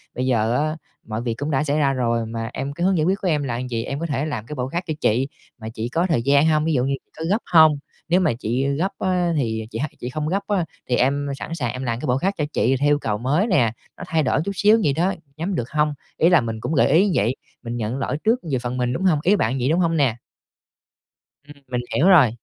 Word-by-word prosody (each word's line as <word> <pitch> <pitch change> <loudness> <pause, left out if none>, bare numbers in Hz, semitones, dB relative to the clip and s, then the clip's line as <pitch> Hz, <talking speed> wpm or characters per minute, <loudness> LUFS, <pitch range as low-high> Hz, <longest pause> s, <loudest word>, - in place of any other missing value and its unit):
bây 125 - -1
giờ 115 -2 +1
á, 155 +2 -1 0.3
mọi 110 +1 -3
việc 120 -1 -2
cũng 145 +6 -4
đã 135 0 +1
xảy 145 0 0
ra 140 -3 +2
rồi 120 -3 0
mà 115 0 -4
em 135 +1 -4
cái 170 +4 -2
hướng 190 -1 +3
giải 155 - +2
quyết 190 +3 +2
của 190 - -1
em 150 -4 +1
là 120 -3 -2
vậy, 115 -1 -1
em 140 +4 -4
có 165 - -2
thể 145 -2 -1
làm 125 -8 -4
cái 150 - -7
bộ 125 -2 -2
khác 170 +7 -3
cho 155 - -1
chị 125 +5 +2 0.3
mà 110 -2 -7
chị 115 +1 -4
có 170 +6 +1
thời 155 -8 +2
gian 140 +4 +4
hông? 155 -1 +2
Ví 160 - +1
dụ 125 -3 +2
như 135 +1 0
chị - - -47
có 160 - -4
gấp 210 +4 +1
hông? 160 -3 +7 0.3
Nếu 175 +2 +4
mà 185 - +2
chị, 125 +3 -1
ơ, 140 - +1
gấp 170 +8 -1
á 180 -2 +1
thì 110 -5 -2
chị 115 - -4
h - - -1 0.2
chị 125 - -5
không 150 +3 -3
gấp 195 +5 -1
á 195 -5 +1 0.2
thì 125 - +3
em 140 +3 +1
sẵn 165 - -5
sàng 125 -7 -2
em 130 +1 -5
làm 115 -2 -2
cái 155 - -5
bộ 125 0 +2
khác 190 +8 0
cho 150 - 0
chị 130 +3 +2
theo 145 +1 +2
yêu 145 0 +3
cầu 105 -6 -2
mới 145 - +1
nè, 125 - +3 0.3
nó - - -7
thay 160 -1 +1
đổi 135 - +1
chút 200 - -1
xíu 210 +6 +5
vậy 145 - +2
đó, 175 +6 +1 0.2
nhắm 180 +4 -2
được 120 -6 -3
hông?" 150 0 +1 0.2
Ý 165 - +4
là 175 -5 +5
mình 115 -1 -4
cũng 145 - -3
gợi 135 - +4
ý 165 +6 +6
như 205 - +1
vậy, 115 +3 +1 0.3
mình 120 0 -4
nhận 115 +2 -2
lỗi 140 +1 -2
trước 230 +3 +3
về 130 - +2
phần 125 +1 -4
mình, 125 0 0
đúng 175 - -3
hông? 175 -6 +3
Ý 195 +4 +4
bạn 130 - 0
vậy, 125 +2 0
đúng 165 +3 +2
hông 165 -2 +1
nè? 130 -6 +2 1.3
Ừm, 145 -1 -15
mình 125 -1 -2
hiểu 165 - +4
rồi. 170 -11 +7
140 Hz, 290 wpm, -22 LUFS, 125-165 Hz, 1.3 s, hông